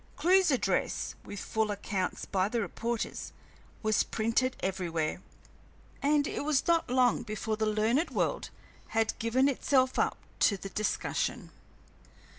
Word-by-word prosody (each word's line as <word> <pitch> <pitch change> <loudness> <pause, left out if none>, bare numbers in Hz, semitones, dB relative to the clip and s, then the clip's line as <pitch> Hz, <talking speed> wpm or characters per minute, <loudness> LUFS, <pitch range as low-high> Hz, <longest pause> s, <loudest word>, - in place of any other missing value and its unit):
Clewe's 375 +1 +4
address, 260 -4 0
with 205 - -7
full 220 +2 -1
accounts 200 -2 -2
by 190 0 0
the 235 - -1
reporters, 230 +2 -3 0.5
was 215 0 +3
printed 230 +4 0
everywhere, 170 -4 -2 0.8
and 290 0 +3
it - - -3
was 295 -2 +1
not 335 -5 +3
long 250 -1 +3
before 215 -1 -3
the 220 0 0
learned 220 +9 +2
world - - -1 0.5
had 225 0 +2
given 250 +4 +3
itself 260 -1 +2
up - - +1 0.2
to 200 - +4
the 195 - -7
discussion. 215 +2 -2
225 Hz, 130 wpm, -30 LUFS, 210-265 Hz, 0.8 s, Clewe's